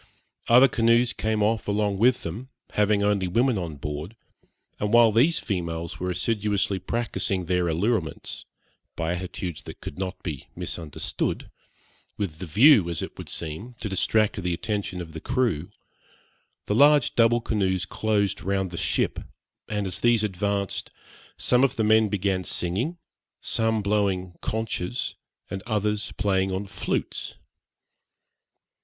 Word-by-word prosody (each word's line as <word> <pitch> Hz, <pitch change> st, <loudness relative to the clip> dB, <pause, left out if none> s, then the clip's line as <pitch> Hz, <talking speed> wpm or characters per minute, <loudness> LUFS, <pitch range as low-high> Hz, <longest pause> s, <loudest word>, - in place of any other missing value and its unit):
Other 125 Hz, +3 st, +8 dB
canoes 120 Hz, 0 st, +3 dB
came 110 Hz, -1 st, 0 dB
off 110 Hz, 0 st, 0 dB
along 100 Hz, -1 st, 0 dB
with 125 Hz, +3 st, +3 dB
them, 110 Hz, +11 st, -6 dB, 0.2 s
having 105 Hz, -1 st, +2 dB
only 100 Hz, -2 st, +2 dB
women 115 Hz, +4 st, +2 dB
on 85 Hz, -4 st, -4 dB
board; 75 Hz, +8 st, -5 dB, 0.6 s
and 105 Hz, 0 st, -1 dB
while 120 Hz, -1 st, +7 dB
these 130 Hz, +10 st, +4 dB
females 85 Hz, -4 st, -3 dB
were 90 Hz, -, -2 dB
assiduously 100 Hz, +1 st, 0 dB
practising 100 Hz, -2 st, -1 dB
their 90 Hz, 0 st, +1 dB
allurements, 90 Hz, +1 st, -1 dB, 0.5 s
by 85 Hz, +1 st, -1 dB
attitudes 90 Hz, -2 st, -5 dB
that -, -, -10 dB
could 70 Hz, -, -8 dB
not 95 Hz, -1 st, -4 dB
be 75 Hz, -7 st, -5 dB
misunderstood, 80 Hz, -4 st, -3 dB, 0.7 s
with 90 Hz, -7 st, -3 dB
the 95 Hz, -, -5 dB
view, 110 Hz, -, +6 dB
as 85 Hz, -, -2 dB
it -, -, -7 dB
would -, -, -7 dB
seem, 95 Hz, +10 st, -5 dB
to 110 Hz, -, -5 dB
distract 105 Hz, +2 st, +1 dB
the 90 Hz, -1 st, -1 dB
attention 100 Hz, -1 st, -3 dB
of 85 Hz, -2 st, -8 dB
the 80 Hz, -, -7 dB
crew, 100 Hz, -11 st, 0 dB, 1.0 s
the -, -, 0 dB
large 145 Hz, +3 st, +5 dB
double 120 Hz, 0 st, +4 dB
canoes 95 Hz, -6 st, 0 dB
closed 105 Hz, 0 st, 0 dB
round 95 Hz, -1 st, -1 dB
the 85 Hz, -, -6 dB
ship; -, -, 0 dB, 0.5 s
and 105 Hz, -1 st, -1 dB
as 90 Hz, -2 st, -3 dB
these 120 Hz, -2 st, +4 dB
advanced, 100 Hz, 0 st, -2 dB, 0.5 s
some 125 Hz, +1 st, +3 dB
of 135 Hz, -, +2 dB
the 110 Hz, -, 0 dB
men 110 Hz, 0 st, +4 dB
began 95 Hz, -2 st, 0 dB
singing, 105 Hz, -, -1 dB, 0.4 s
some 110 Hz, -1 st, +2 dB
blowing 100 Hz, -3 st, 0 dB
conchs, 110 Hz, 0 st, -2 dB, 0.4 s
and 95 Hz, -, -3 dB
others 105 Hz, -1 st, -1 dB
playing 95 Hz, -1 st, +1 dB
on 95 Hz, +2 st, -2 dB
flutes. 95 Hz, -, -3 dB
100 Hz, 140 wpm, -25 LUFS, 90-110 Hz, 1.0 s, Other